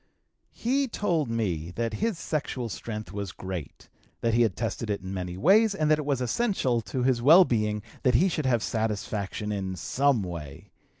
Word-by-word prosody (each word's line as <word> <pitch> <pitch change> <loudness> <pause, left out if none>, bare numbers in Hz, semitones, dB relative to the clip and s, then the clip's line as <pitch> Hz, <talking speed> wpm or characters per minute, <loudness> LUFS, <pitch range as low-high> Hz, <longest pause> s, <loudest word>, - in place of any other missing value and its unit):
He 270 +4 +1
told 170 - 0
me 90 -9 -1
that 115 -1 -1
his 225 -6 0
sexual 140 -7 -3
strength 105 -2 -6
was 100 -2 -4
great, 95 -5 -7 0.3
that 115 -1 +1
he 120 - +4
had 110 -6 +2
tested 115 0 -3
it 100 -1 -1
in 95 +1 -6
many 90 -1 -4
ways, 200 - +4
and 155 -4 +1
that 155 - +4
it 150 - -3
was 140 -3 0
essential 130 - +1
to 125 +2 -3
his 125 -2 +2
well 165 +8 +8
being 105 -4 0 0.2
that 125 -2 +3
he 175 +11 +5
should 155 -6 -1
have 120 -3 +2
satisfaction 105 -2 -2
in 95 -2 -3
some 130 - +1
way. 85 +1 -8
115 Hz, 185 wpm, -27 LUFS, 100-145 Hz, 0.3 s, well